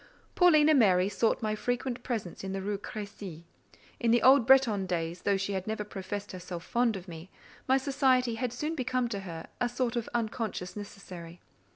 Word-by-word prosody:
Paulina 310 -4 +6
Mary 195 -8 +4
sought 220 +3 +1
my 215 -1 0
frequent 245 +3 -2
presence 220 -10 -4
in 190 0 -4
the 195 - -3
Rue 200 0 -2
Crécy. 200 -6 -7 0.6
In 235 - +1
the 235 +1 +4
old 260 -2 +6
Bretton 235 -8 +5
days, 170 0 -2
though 200 -1 +2
she 195 +1 -2
had 190 0 -3
never 215 -1 -2
professed 205 0 -6
herself 180 -2 -7
fond 235 -2 +1
of 185 0 -10
me, 165 +1 -9 0.4
my 265 +1 +5
society 265 -3 +2
had 235 +1 -2
soon 300 +6 -3
become 255 -4 0
to 205 -4 -3
her 170 -4 -7
a 245 - +1
sort 245 -1 -1
of 235 -2 -2
unconscious 220 -5 -2
necessary. 180 -4 -9
215 Hz, 185 wpm, -30 LUFS, 190-245 Hz, 0.6 s, Paulina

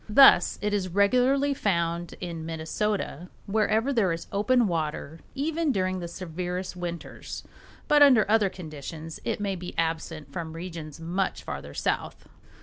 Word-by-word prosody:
Thus 210 -6 +7
it 210 0 0
is 190 -3 0
regularly 255 +9 +3
found 170 -7 -1
in 170 -3 -5
Minnesota 165 +2 -2 0.2
wherever 220 +5 +2
there 210 -8 +3
is 165 0 -3
open 235 +4 +3
water, 160 -2 -3 0.2
even 315 +2 0
during 185 -4 0
the 170 - -4
severest 180 +1 -4
winters, 175 -1 -6 0.4
but 295 0 +5
under 260 -7 +7
other 210 -2 +4
conditions 160 -1 -8
it 230 -2 -1
may 200 -2 -1
be 180 0 -7
absent 160 -3 -2
from 160 0 -4
regions 165 -3 -7
much 175 +4 -2
farther 70 +1 -6
south. - - -2
180 Hz, 145 wpm, -27 LUFS, 165-215 Hz, 0.4 s, Thus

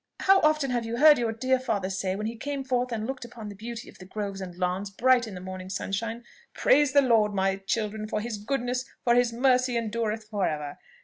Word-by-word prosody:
How 385 0 +6
often 305 -3 +2
have 240 -1 0
you 230 +1 -4
heard 300 0 +7
your 230 -2 0
dear 255 +3 +1
father 205 -7 -2
say, 190 0 -2
when 210 +2 -4
he 225 +2 -3
came 280 +4 -4
forth 250 -1 -1
and 220 -2 -2
looked 265 +1 -5
upon 230 -3 -9
the 205 - -9
beauty 230 +3 -7
of - - -15
the 185 - -10
groves 200 0 -5
and 180 -2 -7
lawns, 180 +2 -1
bright 245 +4 +3
in 205 - -8
the - - -6
morning 185 0 -7
sunshine, 225 +5 -3 0.3
'Praise 290 0 +4
the 285 -1 +6
Lord, 220 -5 +3
my 195 0 +1
children, 215 +2 -2
for 215 - -2
his 220 0 -4
goodness, 250 +2 -2 0.2
for 240 - +4
his 245 -1 +3
mercy 250 0 +2
endureth 220 -1 -2
for 205 -3 0
ever!' 150 -1 -4
225 Hz, 230 wpm, -27 LUFS, 200-250 Hz, 0.3 s, heard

